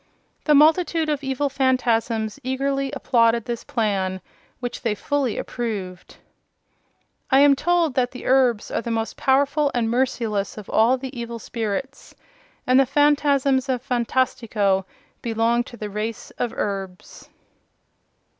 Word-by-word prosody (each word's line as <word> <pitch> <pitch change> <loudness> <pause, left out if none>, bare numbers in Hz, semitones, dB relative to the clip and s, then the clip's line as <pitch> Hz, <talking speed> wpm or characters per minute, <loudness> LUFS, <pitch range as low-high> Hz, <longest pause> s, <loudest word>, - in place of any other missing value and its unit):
The 300 - +5
multitude 320 +1 +4
of 290 -2 -1
evil 270 +1 -1
Phanfasms 240 -4 0
eagerly 275 +1 -1
applauded 230 -2 +2
this 240 -2 -4
plan, 195 -4 -1 0.4
which 245 -1 -5
they 225 -3 0
fully 270 +2 -1
approved. 200 -7 -5 1.1
I 270 0 +5
am 285 -1 +6
told 340 0 +1
that 250 -1 +1
the 250 - -10
Erbs 255 -4 +2
are - - -1
the 235 - -5
most 225 -1 -2
powerful 285 +2 +2
and 230 -2 0
merciless 235 -6 -1
of 210 - -9
all 235 +4 +4
the 265 +1 -7
evil 235 -1 -5
spirits, 230 +4 -5 0.5
and 255 +1 +4
the 270 - +4
Phanfasms 280 -2 +2
of 255 0 -1
Phantastico 230 -6 0 0.4
belong 230 +1 +1
to 240 - -11
the 210 - -5
race 215 +2 -5
of 240 - -1
Erbs. 195 -3 -5
245 Hz, 135 wpm, -23 LUFS, 225-275 Hz, 1.1 s, am